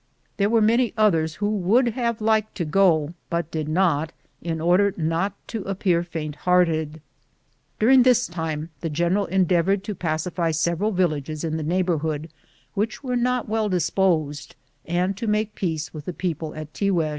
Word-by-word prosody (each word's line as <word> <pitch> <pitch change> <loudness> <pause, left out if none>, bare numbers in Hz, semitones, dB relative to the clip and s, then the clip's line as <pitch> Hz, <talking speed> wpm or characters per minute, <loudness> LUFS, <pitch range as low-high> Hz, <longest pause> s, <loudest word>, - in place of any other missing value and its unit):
There 200 0 +2
were 225 -1 +3
many 230 +1 +2
others 165 -8 +2
who 205 +3 -1
would 215 +5 +3
have 235 -2 -2
liked 220 0 +1
to 175 - -2
go, 160 -2 +3 0.2
but 170 -1 -2
did 155 -1 -3
not, 160 -2 +1 0.3
in 165 -1 -3
order 180 +5 +3
not 165 +4 0 0.2
to 215 -4 -5
ap 195 -1 -4
pear 175 -4 +3
faint 155 -4 -5
hearted. 160 -4 +1 0.8
During 255 +4 +6
this 250 -1 +4
time 160 -2 -4
the 165 - -3
general 175 +6 0
endeavored 190 +1 +2
to 210 - -4
pacify 165 0 -2
several 170 +5 0
villages 155 -6 -1
in 160 -1 -1
the - - -3
neighborhood 160 -2 -1 0.4
which 220 +6 -2
were 250 -2 -2
not 250 0 0
well 215 0 0
disposed, 160 -5 0 0.3
and 180 +3 0
to 230 - -4
make 210 0 0
peace 160 -6 -3
with 150 -2 -8
the 180 - -4
people 160 -3 -4
at 155 -1 -8
Tiguex. 180 -6 +1
175 Hz, 170 wpm, -23 LUFS, 160-205 Hz, 0.8 s, During